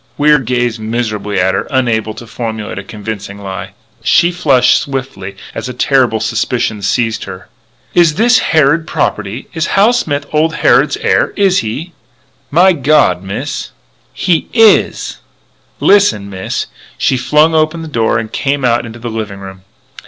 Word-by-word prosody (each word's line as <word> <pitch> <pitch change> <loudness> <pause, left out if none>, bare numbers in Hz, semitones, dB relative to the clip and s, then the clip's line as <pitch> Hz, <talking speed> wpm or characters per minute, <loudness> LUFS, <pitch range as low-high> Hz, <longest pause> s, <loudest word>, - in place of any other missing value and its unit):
Wier 150 0 +4
gazed 125 -2 -1
miserably 110 -3 -2
at 95 +1 +2
her, - - -2
unable 115 -5 0
to 120 - -9
formulate 110 -3 -5
a - - -7
convincing 105 -1 -7
lie. 95 -1 -7 0.3
She 170 +8 +3
flushed 150 -8 +3
swiftly 130 -9 -5 0.2
as - - -5
a 125 - -7
terrible 125 -4 +2
suspicion 105 0 -1
seized 115 +2 -1
her: 95 -1 -10 0.4
"Is 170 -4 +4
this 240 +4 +4
Harrod 155 +1 +2
property? 110 +5 -2
Is 160 0 -1
Hal 210 +5 +5
Smith 145 -11 -1
old 160 +1 +1
Harrod's - - +3
heir? - - +1
Is 195 -3 +3
he?" 140 +11 -5 0.6
"My 180 +5 +5
God, 145 - +2
Miss 95 +1 -5 0.2
" - - -39 0.2
"He 170 -3 +1
is!" 225 -3 +3 0.6
"Listen, 150 - +3
Miss 95 -1 -3 0.2
" - - -24
She - - +1
flung 150 +6 +3
open 160 +1 +1
the - - -7
door 115 -7 0
and 110 -1 -4
came 140 -1 -1
out 120 0 +1
into 115 +1 -10
the 120 0 -6
living 110 -3 -5
room. 95 -1 -10
120 Hz, 160 wpm, -14 LUFS, 105-155 Hz, 0.6 s, Hal